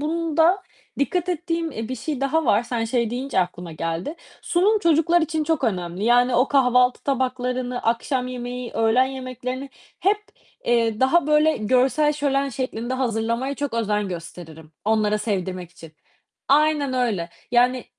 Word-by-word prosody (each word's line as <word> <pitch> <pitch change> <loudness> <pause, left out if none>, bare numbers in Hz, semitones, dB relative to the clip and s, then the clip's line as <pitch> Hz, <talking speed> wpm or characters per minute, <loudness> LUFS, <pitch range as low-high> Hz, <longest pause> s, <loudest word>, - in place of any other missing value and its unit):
bunda 330 +4 +2 0.4
dikkat 355 +5 0
ettiğim, 335 -1 -2
eee, 225 +1 -5
bir 255 - -3
şey 300 -5 -4
daha 300 +4 +1
var, 210 -3 +3
sen 240 -1 -2
şey 235 -1 0
deyince 250 -2 -1
aklıma 175 -1 -4
geldi. 165 - -3 0.3
Sunum 400 +5 +2
çocuklar 335 -1 +3
için 315 -1 -1
çok 315 -3 0
önemli. 180 -1 -2
Yani 245 +1 +4
o 250 +3 +3
kahvaltı 250 -2 +3
tabaklarını, 250 -2 -2
akşam 250 +3 0
yemeği, 250 -1 -5
öğlen 225 +3 +3
yemeklerini 255 0 -6 0.3
hep, 405 +2 +3 0.5
eee, 230 -2 +1
daha 275 +5 +3
böyle 305 +1 +3
görsel 255 +6 +2
şölen 280 -1 0
şeklinde 255 -1 -3
hazırlamaya 235 +1 -1
çok 285 -4 -4
özen 210 -3 0
gösteririm 165 -2 -9
onlara 215 -1 +2
sevdirmek 185 -4 -3
için. 165 -3 -14 0.6
Aynen 295 -1 +3
öyle. 220 -10 -1 0.2
Yani, 250 +1 +3
250 Hz, 145 wpm, -23 LUFS, 225-290 Hz, 0.6 s, Yani